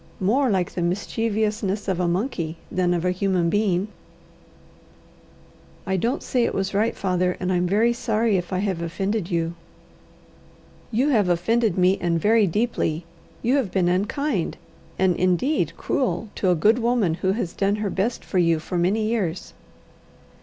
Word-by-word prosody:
more 245 +8 +2
like 185 -4 0
the 175 - -3
mischievousness 210 +2 -1
of 185 -2 0
a 180 - +1
monkey 170 - -2
than 180 -1 +1
of 175 0 0
a 180 - +2
human 185 -2 0
being!" 200 -2 +1 2.0
"I 190 -1 0
don't 235 - -1
say 250 -2 +1
it - - -1
was 195 +1 -1
right, 215 +3 +1
father; 180 -1 0
and 185 0 -1
I'm 180 0 +1
very 220 +6 +3
sorry 230 -2 0
if 180 -1 -2
I 185 - 0
have 190 -3 -1
offended 195 +3 -2
you." 165 -2 -1 1.4
"You 250 +6 +2
have 210 -9 +3
offended 210 +4 +1
me, 185 +1 +3
and 170 -1 +1
very 215 +3 +4
deeply. 175 -5 -1 0.4
You 250 +4 +3
have 255 -8 0
been 180 -1 +1
unkind 205 - -1 0.4
and 185 -2 +2
indeed 180 - +1
cruel 220 -6 -1
to 190 - 0
a 180 - +4
good 215 +9 +3
woman 235 -7 +1
who 185 +3 0
has 190 -6 -3
done 200 +1 +1
her 210 -2 -2
best 215 +6 -2
for 185 - 0
you 165 -2 +3
for 175 +3 -3
many 200 +5 +1
years!" 195 -7 -2
190 Hz, 165 wpm, -23 LUFS, 175-220 Hz, 2.0 s, very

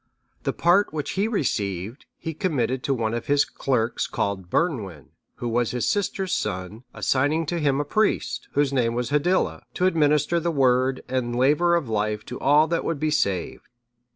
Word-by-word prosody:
The - - -1
part 175 +4 +3
which 150 -2 -3
he 200 +3 0
received, 105 - -2
he 160 - -5
committed 135 -7 -1
to 140 - +1
one 110 -2 -1
of 120 - -4
his 145 0 +3
clerks 120 -3 -1
called 95 -3 -3
Bernwin, 100 - -2 0.3
who 120 - -5
was 120 0 +1
his 125 -1 -1
sister's 195 -2 -1
son, 95 +6 -3
assigning 145 +5 +1
to 170 +3 -2
him 140 -3 +1
a 145 - -1
priest, 215 +8 0
whose 145 -1 +1
name 120 -3 +1
was 125 +2 -2
Hiddila, 175 +6 +1
to 180 - +1
administer 155 -1 +2
the 170 +1 -1
Word 130 -3 +2
and 125 -2 -2
laver 150 +7 +3
of 165 -6 -1
life 105 -1 -1
to 125 - -7
all 150 +2 +5
that 165 +1 -1
would 165 -4 -2
be 155 +1 0
saved. 100 - -1
135 Hz, 180 wpm, -24 LUFS, 115-160 Hz, 0.3 s, all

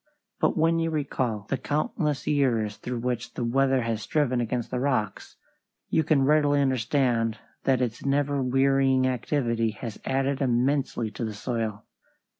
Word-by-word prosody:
But - - +1
when 165 +1 +3
you 165 0 0
recall 130 -8 -2
the 135 - -2
countless 150 - -1
years 115 -8 +1
through 120 -1 -4
which 120 -1 -3
the 125 - -2
weather 135 +1 +2
has 115 -1 -2
striven 130 +1 0
against 120 0 -3
the 125 - -1
rocks, 125 -7 -2 0.5
you 160 - +2
can 145 -3 +3
readily 145 0 +3
understand 125 -3 +1 0.3
that 130 -2 +3
its 120 -2 -4
never 140 0 +1
wearying 135 0 +3
activity 120 -2 0
has 115 -4 -6
added 135 +1 0
immensely 125 -2 0
to 110 - -5
the 110 -2 -3
soil. 110 -2 -3
130 Hz, 150 wpm, -26 LUFS, 115-140 Hz, 0.5 s, when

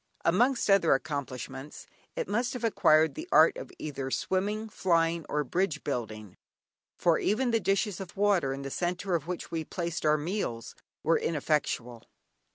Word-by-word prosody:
Amongst 240 +9 +3
other 195 -7 +5
accomplishments 135 -1 -5 0.3
it - - -2
must 235 +5 0
have 250 - -6
acquired 160 -8 +4
the 320 +4 -8
art - - +6 0.2
either 140 -3 -5
of 135 - -3
swimming, 205 +4 -1
flying 170 -5 +1
or 150 0 0
bridge 165 +1 -1
building, 110 - -5 0.6
for 170 -2 +3
even 240 +4 +1
the 225 - +3
dishes 195 0 0
of 185 -1 -9
water, 195 -9 +2
in 135 +1 -5
the 135 - -5
centre 180 +3 -2
of 165 -2 -1
which 180 0 -5
we 165 -1 -2
placed 170 0 -4
our 155 0 +4
meals, 150 - -3 0.3
were 165 - +3
ineffectual. 140 -6 -1
170 Hz, 160 wpm, -29 LUFS, 145-195 Hz, 0.6 s, art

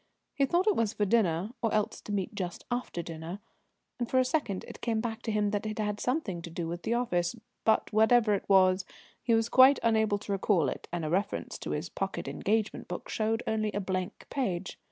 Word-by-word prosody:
He 275 -2 +2
thought 350 +6 +2
it 425 - +3
was 225 -2 +1
for 210 - 0
dinner, 190 -2 +2
or 225 - +1
else 215 +1 0
to - - -8
meet 200 +1 -2
just 185 -4 -5
after 240 -8 -2
dinner, 165 +3 -6 0.6
and 240 - -2
for 260 - +1
a 255 - +5
second 240 -9 -1
it - - -10
came 225 -2 0
back 225 0 -3
to 225 - -3
him 210 -1 +1
that 210 +1 -1
it 215 - -4
had 210 -1 -1
something 245 - -1
to 170 - -7
do 165 0 -4
with 170 +1 -4
the 230 +7 0
office, 180 -5 0 0.3
but, 220 0 +2
whatever 220 0 +5
it 200 - -2
was, 185 -1 +5 0.4
he 230 - +3
was 225 0 +2
quite 260 +3 +7
unable 220 -2 +3
to 205 0 -7
recall 190 -6 +2
it, - - -6
and 170 -2 -2
a - - -2
reference 195 +3 -1
to - - -6
his 150 +4 -2
pocket 195 +2 -4
engagement 215 +1 -1
book 175 - -6
showed 225 +1 0
only 215 -1 0
a 205 - -1
blank 185 0 -3
page. 190 -10 -2
210 Hz, 220 wpm, -30 LUFS, 185-230 Hz, 0.6 s, quite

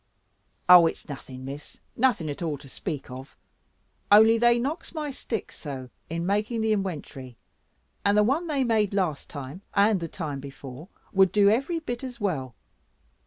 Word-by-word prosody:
"Oh, 180 -2 +9
it's - - -5
nothing, 130 -2 -8
Miss; 140 +2 -9 0.2
nothing 230 -10 +2
at 145 +2 -5
all 160 -4 -2
to 140 - -14
speak 145 -1 -6
of: 130 +2 -10 0.7
only 220 +2 +7
they 240 0 +5
knocks 295 +8 -4
my 300 -2 -3
sticks 230 -4 -5
so 130 -4 -7 0.2
in 170 +1 -3
making 210 +4 0
the 220 0 +2
inwentory, 145 - -5 0.7
and 200 +1 +3
the 210 - +6
one 285 +10 +1
they 285 -4 +1
made 215 -4 +1
last 175 -8 -1
time, 145 +4 -7
and 205 0 +4
the 165 - -4
time 150 -4 -5
before, 135 +3 -10 0.2
would 190 -2 +5
do 205 -1 +5
every 275 +10 0
bit 245 -6 -5
as 250 -2 -7
well. 140 - -2
195 Hz, 165 wpm, -26 LUFS, 145-230 Hz, 0.7 s, Oh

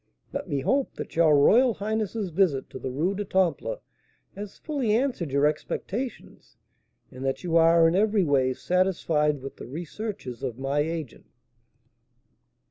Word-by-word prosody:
Let - - -4
me 140 -1 -1
hope 270 - 0
that - - -7
your 160 -3 +5
royal 230 - +5
highness's 215 -2 -2
visit 160 -6 +1
to - - -7
the 130 - -4
Rue 155 +9 0
du 205 +1 -3
Temple 190 - 0 0.5
has 205 0 -8
fully 270 -9 -1
answered 235 - -1
your 140 +1 +3
expectations, 200 - -4 0.5
and 130 0 -9
that 135 +5 -2
you 170 -2 -1
are 165 0 +6
in 165 - +2
every 205 +1 +3
way 135 -4 +2
satisfied 160 -6 +1
with 135 - -8
the - - -9
researches 165 - -6
of 120 - -4
my 135 +2 -1
agent?" 155 -3 -4
170 Hz, 150 wpm, -26 LUFS, 145-210 Hz, 0.5 s, are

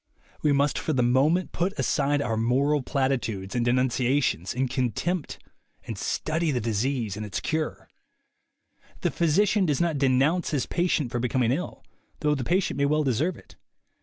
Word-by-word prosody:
We 150 - +3
must 140 +1 +2
for 155 - -2
the 125 -3 +2
moment 145 +9 +2
put 190 +4 -2
aside 145 -1 +1
our 115 -2 -1
moral 135 +6 +2
platitudes 125 -8 -1
and 120 -1 0
denun 125 +2 +2
ciations 125 - 0
and 130 +1 0
contempt 140 +8 -2 0.5
and 115 - -5
study 160 - -1
the 130 -4 0
disease 115 0 -1
and 105 - -5
its 105 -2 -3
cure. 155 -1 -3 1.1
The - - +1
physician 190 +4 +2
does 145 -3 +1
not 170 -4 0
denounce 140 +6 +2
his 145 -5 0
patient 170 -8 0
for 120 - -1
becoming 125 -1 +1
ill, 165 +8 -3 0.4
though 150 -1 +2
the 135 -3 -2
patient 175 -1 0
may 140 - +3
well 150 +2 +2
deserve 145 +7 0
it. - - -18
140 Hz, 165 wpm, -26 LUFS, 125-155 Hz, 1.1 s, We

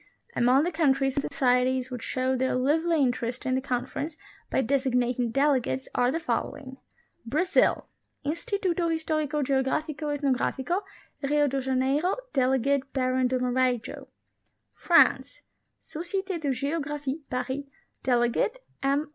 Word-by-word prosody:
Among 255 +4 +4
the 350 - 0
countries 275 -5 +2
and - - +3
societies 255 -1 +2
which 250 -2 -5
showed 255 +1 -1
their 260 0 +1
lively 310 +4 +2
interest 245 0 -2
in 260 - +1
the 260 - +1
Conference 280 +4 -3 0.3
by - - +1
designating 250 -2 +1
delegates 265 0 +1
are 245 0 +2
the 330 - -1
fol - - -1
lowing: 265 -2 -10 0.5
BRAZIL. 320 +10 +2 0.4
Instituto 340 +2 -1
Historico 310 -2 -1
Geografico 275 +3 -1
y 290 0 -1
Ethnografico 280 +5 0 0.4
(Rio 295 +1 +2
de 270 0 -1
Ja 265 0 -2
neiro); 280 +8 +1 0.2
delegate, 265 +1 +1
Baron 255 -1 +1
de 255 +1 0
Marajo. 250 -2 -1 0.7
FRANCE. - - +3 0.4
Societe 365 +3 -4
de 295 -3 -2
Geographic 285 +1 -2
(Paris); 260 +2 -3 0.4
delegate, 245 - +1 0.2
M 275 +2 +2
E. 310 - -17
270 Hz, 130 wpm, -27 LUFS, 255-300 Hz, 0.7 s, Among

